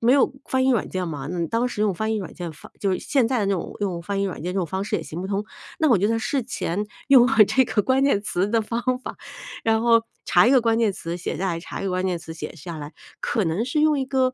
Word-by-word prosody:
没 235 +2 +4
有 275 -1 +4
翻 260 0 +1
译 - - +4
软 230 -6 +1
件 185 -1 -3
嘛， 140 -3 -5
你 175 -1 -2
当 235 +2 +1
时 210 - -4
用 210 -2 +3
翻 220 +4 -1
译 - - 0
软 190 -5 -6
件 175 -3 -6
翻 - - -14
就 195 - 0
是 - - 0
现 265 -5 +2
在 250 0 0
的 200 - 0
这 200 - +2
种 185 - -3
用 185 -4 -1
翻 195 +2 -2
译 - - +1
软 185 -6 -4
件 180 +1 -2
这 195 - -1
种 180 - +1
方 190 +5 -3
式 - - -3
也 165 - -4
行 160 +3 -7
不 190 - -4
通。 200 +1 -2 0.4
那 310 - +4
我 225 - +6
觉 200 - +2
得 - - +1
在 - - 0
事 260 +5 0
前 205 -4 -3 0.2
用 255 -3 +8
了 270 - +1
这 260 - +3
个 220 -3 0
关 265 +4 +2
键 240 -8 +3
词 200 -2 0
的 230 +1 +2
方 230 +2 -3 0.2
法。 - - -6 0.5
然 225 0 +3
后 230 -1 +4 0.2
查 180 +4 +5
一 - - +5
个 265 -2 +6
关 230 -1 +2
键 220 -4 +2
词 170 -1 -5
写 175 - -4
下 195 - -1
来， 170 -1 -1
查 170 - -7
一 - - -4
个 190 - -1
关 185 +1 0
键 180 -2 0
词 165 -1 -9
写 155 0 -7
下 170 +1 -8
来。 150 0 -7 0.3
可 220 -5 0
能 165 +8 0
是 265 +5 0
用 305 -2 +3
一 265 - 0
个， 260 -1 +1
205 Hz, 330 characters per minute, -23 LUFS, 180-240 Hz, 0.5 s, 用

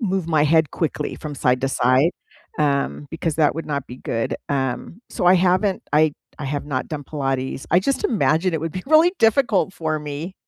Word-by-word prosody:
move 190 -6 -1
my 155 -3 +3
head 160 0 +3
quickly 155 -2 -2
from 150 -2 -7
side-to-side, 130 +3 +2 0.5
um, 145 -1 0
because 160 -1 -2
that 155 -2 +3
would 165 - -5
not 140 -2 -3
be 125 - -9
good, 115 -3 -2
um, 135 - -3
so, - - -2
I 180 - +7
haven't 185 +2 +2
I 155 0 +4 0.3
I 150 - -5
have 145 +1 -3
not 130 -3 -3
done 150 -2 -5
Pilates 135 -2 -3
I 175 - +5
just 275 - -1
imagine 185 - +2
it 160 - -1
would 165 -1 -4
be 185 - -5
really 315 +4 +5
difficult 225 -4 +3
for 155 -1 -2
me. 150 +5 -6
155 Hz, 190 wpm, -22 LUFS, 140-185 Hz, 0.5 s, I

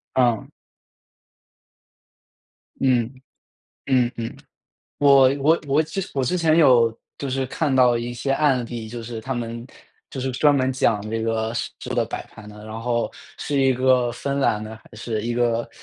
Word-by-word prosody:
嗯。 120 -4 +2 2.3
嗯。 125 -2 +2 0.8
嗯 125 -2 +2
嗯。 115 -1 -5 0.6
我 140 -2 +7
我 155 +4 +3
我 140 +3 +3
之 160 +5 -4
我 135 -2 0
之 180 +9 0
前 160 -2 +3
有 120 -7 +5 0.2
就 140 - -4
是 130 0 -1
看 145 0 -1
到 125 -2 +5
一 120 +1 -4
些 130 +3 -2
案 135 -3 +2
例， 115 -2 -6
就 120 +1 -7
是 115 0 -6
他 130 +4 -4
们 115 0 -5 0.4
就 135 -4 -6
是 130 0 -2
专 145 +3 +4
门 130 -1 +1
讲 115 -5 +1
这 115 0 -2
个 110 0 -1
食 120 - -3 0.2
物 - - -2
的 - - +2
摆 - - -5
盘 105 0 -14
的。 105 0 -12
然 110 +1 -7
后 120 -1 -1 0.3
是 145 -2 -1
一 135 -1 +4
个 125 -1 +2
芬 140 +3 -3
兰 105 -5 +1
的 110 +1 -8
还 110 - -18
是 110 0 -4
一 120 0 -2
个 120 -1 0
120 Hz, 185 characters per minute, -23 LUFS, 115-135 Hz, 2.3 s, 我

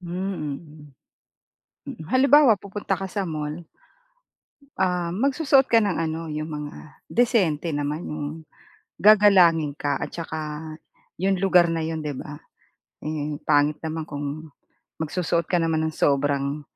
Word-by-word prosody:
Hmm, 175 -5 -4
mm. 155 -1 -15 1.2
Mm, 155 - -9
halimbawa, 275 -1 +6
pupunta 200 0 -4
ka 190 0 -5
sa 200 +1 -2
mall, 155 +1 -5 1.2
ah, 180 -2 0
magsusuot 270 - +2
ka 230 - +5
ng 205 -5 +1
ano, 160 +1 -3
'yong 155 +1 -4
mga 150 -1 -6 0.3
disente 185 - +1
naman, 145 +2 -2
'yong 150 -1 -4 0.7
gagalangin 185 -8 +5
ka 145 -2 -2
at - - -4
saka 165 -2 -5 0.8
'yong 195 +1 +2
lugar 180 -2 +4
na 165 -1 -1
'yon 160 0 -3
'di 150 -3 -4
ba, 145 +3 -7 0.7
eh, 150 -1 -4
pangit 150 0 +3
naman 160 0 -4
kung 145 +1 -6 0.5
magsusuot 170 +1 -1
ka 180 - +2
naman 160 -1 +1
ng 155 - -6
sobrang 140 +1 +1
160 Hz, 135 wpm, -24 LUFS, 150-190 Hz, 1.2 s, halimbawa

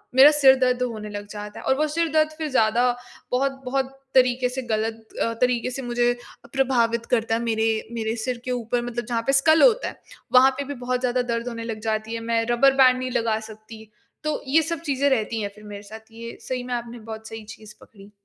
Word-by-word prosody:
मेरा 275 +3 +9
सिर 275 -3 +6
दर्द 250 -1 +2
होने 215 -4 -4
लग 205 0 -7
जाता 210 0 -7
है। - - -10
और 265 - +3
वो 305 +2 +1
सिर 330 +3 0
दर्द 310 0 +3
फिर 315 - -3
ज़्यादा 240 +1 +3 0.4
बहुत-बहुत 270 0 -1 0.2
तरीक़े 250 -1 +4
से, 260 +1 -4
गलत 225 -1 -3 0.2
अ, 230 - -1
तरीक़े 250 -1 +2
से 265 +2 -5
मुझे 240 0 +1 0.3
अ, - - -13
प्रभावित 235 -4 +1
करता 225 -2 +2
है। 230 - -1
मेरे, 225 -1 0
मेरे 225 -1 -2
सिर 250 -1 -3
के 255 - -2
ऊपर 240 0 -1
मतलब 240 -2 -4
जहाँ 235 -1 -1
पे 275 - +3
स्कल 315 +4 +5
होता - - +4
है, - - -8 0.3
वहाँ 260 +1 +7
पे 285 - -2
भी 285 - -5
बहुत 250 0 0
ज़्यादा 250 0 0
दर्द 235 -1 -3
होने 230 -1 -5
लग 225 -2 -5
जाती 220 0 -2
है, 230 - -3
मैं 230 0 0
रबर 270 +3 +5
बैंड 255 -1 +5
नहीं 255 0 -3
लगा 225 -3 0
सकती। 220 0 -12 0.4
तो 305 -1 -2
ये 310 +5 +4
सब 335 0 -3
चीज़ें 285 -3 +1
रहती 225 -3 0
हैं 205 - -2
फिर 210 - -15
मेरे 205 -1 -8
साथ। 220 +2 -12
ये 230 +1 -9
सही 255 -1 -4
में 250 0 -5
आपने 240 0 -5
बहुत 220 0 -8
सही 225 -1 -8
चीज़ 215 0 -12
पकड़ी। 200 -1 -16
240 Hz, 225 wpm, -24 LUFS, 225-260 Hz, 0.4 s, मेरा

